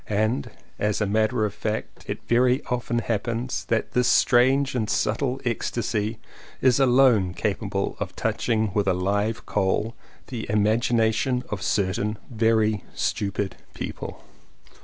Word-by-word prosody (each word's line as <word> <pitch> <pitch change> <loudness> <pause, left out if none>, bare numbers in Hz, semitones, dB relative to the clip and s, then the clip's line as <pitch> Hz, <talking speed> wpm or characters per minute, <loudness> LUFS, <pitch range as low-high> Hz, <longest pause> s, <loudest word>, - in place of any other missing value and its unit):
And 105 -8 0 0.3
as 105 0 0
a 105 - +1
matter 110 +3 +1
of 105 - -3
fact 110 +1 -4
it - - -5
very 125 +2 +3
often 120 -1 -1
happens 115 +2 -2
that 115 - 0
this 125 0 +2
strange 130 +3 +4
and 110 -4 -1
subtle 135 -2 0
ecstasy 115 -2 -1 0.4
is 130 0 +4
alone 125 -8 +4
capable - - -2
of - - -4
touching 110 -1 0
with 100 -1 +1
a 95 - +3
live 105 +4 -1
coal 105 +4 0 0.4
the 115 -5 -5
imagination 115 +4 +2
of 100 -2 -4
certain 100 +2 0
very 110 -2 +2
stupid 100 -1 -2 0.2
people. - - -6
110 Hz, 130 wpm, -25 LUFS, 105-120 Hz, 0.4 s, strange